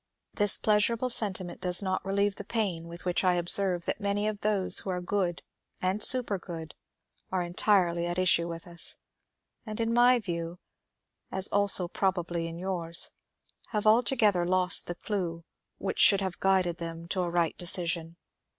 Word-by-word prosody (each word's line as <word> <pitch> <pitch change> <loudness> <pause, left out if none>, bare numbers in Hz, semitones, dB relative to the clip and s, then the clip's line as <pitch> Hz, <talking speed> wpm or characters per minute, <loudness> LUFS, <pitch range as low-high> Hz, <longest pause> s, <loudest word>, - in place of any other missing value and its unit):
This 205 -2 +2
pleasurable 225 +4 +1
sentiment 190 -6 +1
does 180 +1 +5
not 185 -1 -2
reUeve 200 +1 0
the - - -9
pain 190 -8 -3
with 170 +2 -11
which 180 +1 0
I 180 -1 +2
observe 175 0 +3
that - - -3
many 205 +1 -1
of 215 -1 -4
those 205 -3 +2
who - - -6
are 180 -1 -2
good 180 -1 -3 0.4
and 185 +3 -1
supergood 185 -11 +2 0.6
are 185 -1 -1
entirely 175 -1 +1
at 175 0 -4
issue 180 -2 +2
with 165 -1 -8
us, 170 -1 -2 0.7
and 215 -1 -7
in 230 0 -1
my 245 +1 +5
view, 170 -5 -5 0.7
as 190 0 +2
also 200 -3 +2
probably 175 -3 -2
in 165 0 -8
yours, 170 -2 -1 0.6
have 210 -2 -3
altogether 215 -4 +3
lost 180 0 +3
the 175 - -4
clue 175 -5 -4 0.3
which - - -5
should 200 - +5
have 190 -2 -4
g^ded 185 -3 +1
them 165 0 -7
to 185 - -1
a 175 - -2
right 170 -1 -1
decision. 170 -2 -1
185 Hz, 160 wpm, -28 LUFS, 170-205 Hz, 0.7 s, does